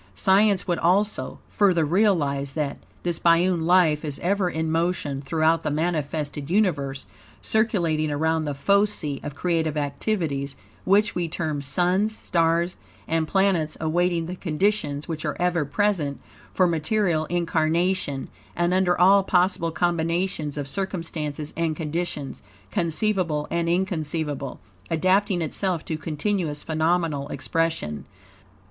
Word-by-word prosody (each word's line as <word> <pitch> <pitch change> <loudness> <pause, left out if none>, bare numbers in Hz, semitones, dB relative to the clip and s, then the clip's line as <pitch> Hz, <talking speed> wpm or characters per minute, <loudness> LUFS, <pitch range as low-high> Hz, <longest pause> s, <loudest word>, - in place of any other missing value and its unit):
Science 195 - +3
would 175 -2 0
also, 195 +5 +1
further 180 -6 +2
realize 145 -7 +1
that, 150 -3 -2 0.2
this 175 -2 -1
biune 170 +1 +3
life 165 -3 +3
is 145 -3 -3
ever 190 0 +1
in 160 -1 -2
motion 165 -4 -1
throughout 160 +3 +2
the 155 - -2
manifested 150 -2 -2
universe; 150 -9 0 0.3
circulating 170 -9 +1
around 160 +2 0
the 145 -1 -3
focii 200 -3 +1
of 145 - -6
creative 160 -2 0
activities, 145 -2 -2 0.3
which 205 +2 +3
we 175 -1 -1
term 155 -3 -2
suns, 180 +9 +1
stars, 170 +1 +1 0.3
and 160 -1 0
planets, 185 -4 +1
awaiting 170 +1 +1
the 180 +2 -5
conditions 165 -4 -1
which 160 -2 -4
are 150 - -2
ever 175 -3 +1
present 160 -4 0 0.3
for 185 - +3
material 170 0 +1
incarnation; 170 -2 0 0.3
and 175 +1 +1
under 185 -2 +2
all 195 +2 +6
possible 180 -2 +2
combinations 165 -2 -1
of 145 -1 -3
circumstances 155 -3 -4
and 165 -1 0
conditions, 155 -3 -4 0.3
conceivable 170 -3 0
and 170 0 0
inconceivable, 160 -6 -2 0.3
adapting 185 +2 +2
itself 175 +1 -1
to 160 - -2
continuous 155 0 -2
phenomenal 160 -2 0
expression. 165 - -2
165 Hz, 125 wpm, -24 LUFS, 150-185 Hz, 0.3 s, all